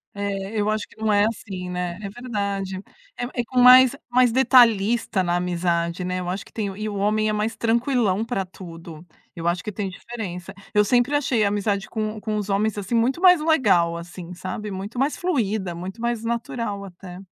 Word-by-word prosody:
É, 200 0 -3
eu 210 - +1
acho 215 0 -1
que - - -21
não 220 - +2
é 205 0 +4
assim, 195 -5 -5
né? 180 -1 -3
É 200 - -5
verdade. 200 -5 -3 0.4
É - - -3 0.2
é - - -5
com 255 - -1
mais 255 +1 +8 0.2
mais 250 -1 +4
detalhista 230 -5 +4
na 175 0 0
amizade, 175 0 -1
né. 185 0 -2
Eu 180 0 -4
acho 190 +2 -4
que - - -19
tem 215 -3 -2
E 215 +1 -3
o 205 - -4
homem 215 +2 +1
é - - 0
mais 215 +2 -1
tranquilão 230 -2 +1
pra 210 -5 -2
tudo. 170 -3 -11 0.3
Eu 170 0 -4
acho 175 +1 0
que 210 - -4
tem 200 -1 -3
diferença. 190 -3 -7 0.2
Eu 210 -1 +3
sempre 245 +5 +2
achei 255 -6 +1
a 200 - +3
amizade 200 -1 -1
com 215 -1 -3
com 215 -1 -2
os 205 -1 -3
homens, 210 +2 0
assim, 205 +2 -4
muito 240 +7 +2
mais 360 -4 +7
legal, 195 - +3
assim, 175 +1 -9
sabe, 210 +4 -5
muito 200 +5 -6
mais 275 +3 +1
fluida, 220 - -1
muito 185 +6 -7
mais 235 -1 -2
natural, 230 -4 -3
até. 180 -1 -11
210 Hz, 200 wpm, -23 LUFS, 185-235 Hz, 0.4 s, mais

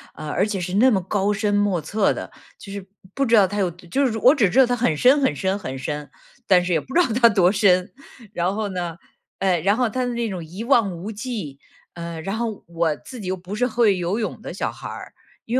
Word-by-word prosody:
呃， 155 - -7
而 190 +6 +1
且 205 -3 -3
是 180 +1 -4
那 250 +5 +5
么 195 -3 +2
高 200 +2 0
深 205 0 0
莫 205 -4 +1
测 205 +7 +1
的。 - - -7 0.3
就 195 - -10
是 200 -2 -6 0.3
不 275 - +1
知 230 -2 +4
道 200 -3 +6
它 205 +2 -5
有 185 -3 +1
就 180 +11 -2
是 225 -3 -1
我 255 +7 +5
只 205 -9 +3
知 255 - +2
道 260 - +8
它 245 - 0
很 225 -11 0
深 270 - +5
很 265 - +2
深 190 +1 -1
很 135 -9 -6
深， 150 +1 -5 0.4
但 180 -2 +4
是 180 - 0
也 160 - +2
不 265 - -11
知 355 - +4
道 - - +2
它 235 - +8
多 185 -4 +4
深。 185 -3 +3 0.4
然 175 +3 0
后 215 0 -2
呢， 175 -3 -4 0.4
哎， 185 -4 +1
然 200 +5 +2
后 250 -2 +2
它 255 +4 -2
的 245 - -2
那 235 -2 -2
种 180 -4 -5
一 185 +8 -7
望 235 -7 +3
无 175 +5 -7
际， 210 - -5 0.4
呃， 170 -1 -6
然 195 +5 -3
后 225 -2 -4
我 165 -2 0
自 250 -4 -10
己 185 - -6
又 185 - -1
不 185 +3 -7
是 245 - +1
会 225 -5 +2
游 180 +5 -1
泳 215 - -4
的 - - -7
小 - - -2
孩 - - -9
儿， - - -9 0.3
因 235 - -3
200 Hz, 275 characters per minute, -22 LUFS, 175-230 Hz, 0.4 s, 道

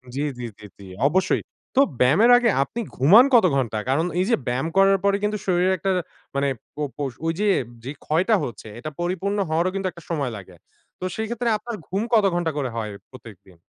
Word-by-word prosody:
জি, 140 - -1 0.2
জি, - - -5 0.2
জি, 105 - -12
জি। - - -12 0.2
অবশ্যই। 185 +5 +1 0.3
তো - - +4 0.2
ব্যায়ামের 165 - +5
আগে 245 -1 +2
আপনি 235 - -7 0.2
ঘুমান 190 - +7
কত 230 -6 +7
ঘন্টা? 120 -5 -1
কারণ 155 +6 +2
এইযে 210 +6 +2
ব্যায়াম 125 +5 -1
করার 195 0 +5
পরে 200 0 +3
কিন্তু 210 0 0
শরীরে 185 0 +2
একটা 195 - -2 0.5
মানে 140 0 +1 0.3
পো 150 - -6 0.2
পোষ 140 -2 -2
ঐযে 165 +6 -1 0.4
যে 135 - -5
ক্ষয়টা 180 +8 +2
হচ্ছে, 110 -1 -7
এটা 155 - -5
পরিপূর্ণ 190 +3 -1
হওয়ারও 170 +4 +1
কিন্তু 195 -1 -1
একটা 170 - -14
সময় 140 -7 -1
লাগে। 95 -2 -12 0.4
তো - - -8
সেই 220 - -2
ক্ষেত্রে 235 0 -1
আপনার 230 +2 -6
ঘুম 195 +3 -2
কত 215 -3 +5
ঘন্টা 175 -2 0
করে 135 -3 -1
হয় 110 -2 -3 0.2
প্রত্যেকদিন? 105 -8 -14
175 Hz, 190 wpm, -23 LUFS, 135-200 Hz, 0.5 s, ঘুমান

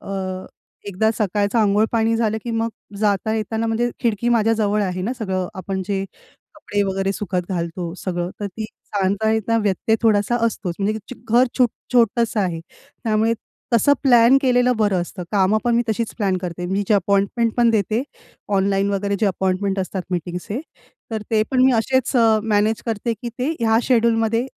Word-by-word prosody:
अ, - - -12 0.8
एकदा 210 +3 +1
सकाळचं 205 +2 0
अंघोळ 210 0 +3
पाणी 225 0 +2
झालं, 220 -1 0
की 235 - -3
मग 225 0 0 0.3
जाता-येताना 220 +2 0
म्हणजे 230 +2 0
खिडकी 230 0 0
माझ्याजवळ 215 -3 +2
आहे 185 -1 -2
ना 230 +7 -1
सगळं 190 -4 -2
आपण 190 +1 -3
जे 195 -1 -1 0.5
कपडे 205 0 -2
वगैरे 195 0 -1
सुखत 180 -4 -3
घालतो 170 -1 -3
सगळं, 175 -1 -3
तर 205 - -2
ती 215 +3 -6
जाता- 205 0 -2
येता 220 +1 +1
व्यत्यय 210 +2 +1
थोडासा 220 +1 +3
असतोच. 180 -6 -3
म्हणजे 205 +2 +1
की 220 - -4 0.2
चु - - -20 0.2
घर 255 - +5
छुट 245 -2 +4 0.2
छोटंसं 230 -2 +2
आहे, 175 -4 -1 0.4
त्यामुळे 220 0 +2 0.4
तसं 285 +5 +5
प्लॅन 245 -1 +6
केलेलं 250 -1 +3
बरं 205 -4 +2
असतं. 180 +1 -7
कामं 200 +2 +3
पण 240 -1 +2
मी 240 - +3
तशीच 220 +1 -2
प्लॅन 195 -3 +1
करते. 175 -1 -5
मी 195 +3 0
जे 215 - +4
अपॉइंटमेंट 200 +4 +1
पण 235 -1 +4
देते, 215 +2 +1 0.6
ऑनलाईन 195 +1 +1
वगैरे 200 0 -1
जे 215 - +3
अपॉइंटमेंट 190 +1 0
असतात 185 0 -3
मीटिंगचे. 180 - -3 0.5
तर 220 -1 -3
ते 215 -1 +3
पण 255 -1 +3
मी 260 - +5
असेच 260 +3 +1
अ, 225 -2 +5
मॅनेज 215 0 +1
करते 230 +1 -1
की 240 - -3
ते 255 +4 0
ह्या 225 -1 +3
शेड्यूलमध्ये 230 0 +2
215 Hz, 175 wpm, -21 LUFS, 195-230 Hz, 0.8 s, प्लॅन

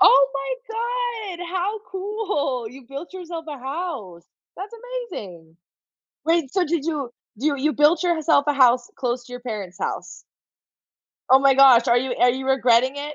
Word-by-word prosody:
Oh 275 0 +7
my 470 - -3
god, 355 - -6
how 380 +4 -2
cool! 380 - -2
You 265 +3 -13
built 275 +7 -8
yourself 340 -3 -7
a 290 - -6
house. 265 - -5 0.3
That's 395 +4 -7 0.4
amazing! 170 - -9 0.7
Wait, 325 -4 +1
so, 370 -2 +2
did 320 -2 -1
you 295 -6 -2 0.3
do 270 - -2
you 290 -2 +2
you 300 +3 +1
built 300 +5 +3
yourself 320 -4 +2
a - - +4
house 250 -3 +4
close 250 -2 -2
to 250 - -13
your 245 - -6
parents' 210 -7 -6
house? - - -5 1.1
Oh 265 - +8
my 275 0 +5
gosh, 260 -3 +7
are 235 - +5
you 255 0 -2
are 245 - +5
you 265 +2 -4
regretting 255 -1 +3
it? 295 +1 -5
280 Hz, 170 wpm, -23 LUFS, 250-350 Hz, 1.1 s, Oh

